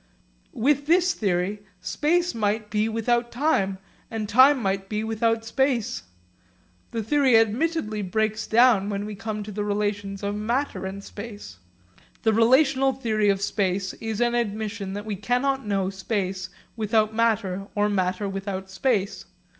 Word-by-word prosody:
With 285 Hz, +4 st, +1 dB
this 360 Hz, +3 st, +4 dB
theory 195 Hz, 0 st, -1 dB, 0.2 s
space 345 Hz, -, 0 dB
might 210 Hz, -1 st, -1 dB
be 215 Hz, +1 st, +1 dB
without 235 Hz, +2 st, 0 dB
time, 230 Hz, -8 st, +1 dB, 0.3 s
and 220 Hz, -2 st, -3 dB
time 260 Hz, +6 st, +6 dB
might 195 Hz, -2 st, -2 dB
be 215 Hz, 0 st, -2 dB
without 225 Hz, 0 st, 0 dB
space. 235 Hz, -, 0 dB, 0.9 s
The 225 Hz, -1 st, -3 dB
theory 265 Hz, 0 st, +4 dB
admittedly 225 Hz, 0 st, +1 dB
breaks 215 Hz, +3 st, -1 dB
down 225 Hz, -4 st, +4 dB
when 200 Hz, 0 st, -3 dB
we 210 Hz, -, -5 dB
come 210 Hz, +1 st, -4 dB
to 210 Hz, -, -8 dB
the 210 Hz, +1 st, -3 dB
relations 205 Hz, -1 st, -2 dB
of 200 Hz, 0 st, -1 dB
matter 235 Hz, 0 st, -2 dB
and 195 Hz, +1 st, -7 dB
space. 205 Hz, -, -9 dB, 0.6 s
The 220 Hz, -1 st, +3 dB
relational 265 Hz, +4 st, +4 dB
theory 215 Hz, -5 st, 0 dB
of 195 Hz, 0 st, +1 dB
space 195 Hz, -2 st, -1 dB
is 225 Hz, 0 st, -3 dB
an 240 Hz, 0 st, +2 dB
admission 215 Hz, -3 st, -2 dB
that 205 Hz, +1 st, -5 dB
we 215 Hz, -2 st, -3 dB
cannot 250 Hz, +4 st, 0 dB
know 195 Hz, -2 st, 0 dB
space 190 Hz, -1 st, -3 dB, 0.3 s
without 220 Hz, -1 st, +1 dB
matter 210 Hz, -4 st, 0 dB
or 205 Hz, 0 st, +2 dB
matter 190 Hz, 0 st, 0 dB
without 195 Hz, -1 st, -5 dB
space. 205 Hz, -2 st, -1 dB
215 Hz, 145 wpm, -25 LUFS, 200-235 Hz, 0.9 s, time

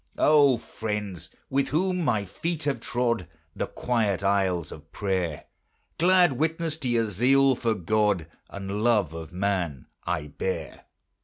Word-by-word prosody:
O 145 Hz, -4 st, +5 dB
friends! 105 Hz, -5 st, -5 dB, 0.2 s
with 140 Hz, +1 st, +2 dB
whom 180 Hz, +3 st, 0 dB
my 110 Hz, -8 st, +1 dB
feet 160 Hz, -, -3 dB
have 140 Hz, -4 st, 0 dB
trod 115 Hz, -6 st, -1 dB, 0.3 s
The -, -, -2 dB
quiet 110 Hz, -6 st, 0 dB
aisles 95 Hz, -4 st, +1 dB
of 80 Hz, 0 st, -12 dB
prayer, 95 Hz, -6 st, -2 dB, 0.5 s
Glad 175 Hz, -2 st, +5 dB
witness 160 Hz, +3 st, -1 dB
to 135 Hz, -6 st, -3 dB
your 115 Hz, -1 st, +2 dB
zeal 130 Hz, +7 st, +4 dB
for 115 Hz, -2 st, 0 dB
God 105 Hz, -2 st, +1 dB, 0.2 s
And 100 Hz, +1 st, -4 dB
love 105 Hz, -9 st, +3 dB
of 80 Hz, -1 st, -7 dB
man 90 Hz, -7 st, -1 dB, 0.2 s
I 85 Hz, -4 st, -2 dB
bear. 75 Hz, +6 st, -5 dB
110 Hz, 140 wpm, -26 LUFS, 95-135 Hz, 0.5 s, O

